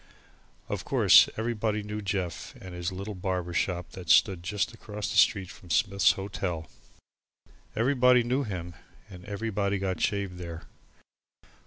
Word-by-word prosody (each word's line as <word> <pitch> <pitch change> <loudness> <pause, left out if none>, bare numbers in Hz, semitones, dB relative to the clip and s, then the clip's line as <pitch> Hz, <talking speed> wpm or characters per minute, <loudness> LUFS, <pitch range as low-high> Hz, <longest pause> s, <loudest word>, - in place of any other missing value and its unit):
Of - - -3
course - - +6
everybody 110 -2 -1
knew 105 +1 -5
Jeff 95 -4 -3
and 95 -1 -10
his 90 +1 -3
little 100 +3 -6
barber 90 -2 -3
shop 85 -1 -1
that 90 -3 -9
stood 90 +2 +5
just 105 +5 -2
across 105 -2 -6
the - - -4
street 95 -2 +3
from 90 - -15
Smith's 100 +1 +3
Hotel. 95 -4 -4 1.1
Everybody 125 0 +4
knew 125 +4 0
him 90 -8 -5 0.4
and 90 -1 -11
everybody 100 -1 -2
got 95 -1 -2
shaved 100 -4 -1
there. 85 -1 -7
100 Hz, 140 wpm, -28 LUFS, 90-105 Hz, 1.1 s, course